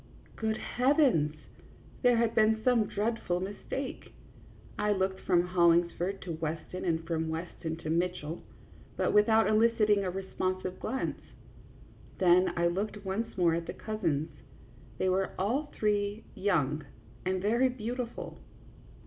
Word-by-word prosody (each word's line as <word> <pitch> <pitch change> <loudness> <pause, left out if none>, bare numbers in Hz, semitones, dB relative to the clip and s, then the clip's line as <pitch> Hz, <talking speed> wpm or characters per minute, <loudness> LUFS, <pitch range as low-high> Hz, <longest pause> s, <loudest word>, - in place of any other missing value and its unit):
Good 220 -1 -1
heavens! 250 - +2 0.7
there 245 -2 +5
had 230 -1 +2
been 220 -1 +3
some 240 -4 +3
dread 220 +3 -1
ful 175 -1 -1
mistake. 205 +7 -5 0.7
I 210 - +2
looked 190 -1 -1
from 175 -2 +2
Hollingsford 175 +1 +2
to 180 - -5
Weston 160 +3 -4
and 165 -2 0
from 160 -1 -1
Weston 160 0 -4
to 160 -1 -7
Mitchell, 170 -1 -1 0.6
but - - +1
without 220 +1 +5
eliciting 215 -2 +3
a 185 - -1
responsive 185 0 -3
glance. 265 - -3 1.0
Then 180 0 +4
I 170 - +2
looked 200 +3 -2
once 195 +3 -3
more 170 -3 +4
at 170 0 -2
the - - -4
cousins; 160 -9 -2 0.7
they 185 - 0
were 190 +1 0
all 245 +11 0
three 205 -3 -1
young 155 -7 0 0.4
and 185 0 0
very 235 +7 +2
beautiful. 245 0 -5
190 Hz, 130 wpm, -30 LUFS, 175-220 Hz, 1.0 s, there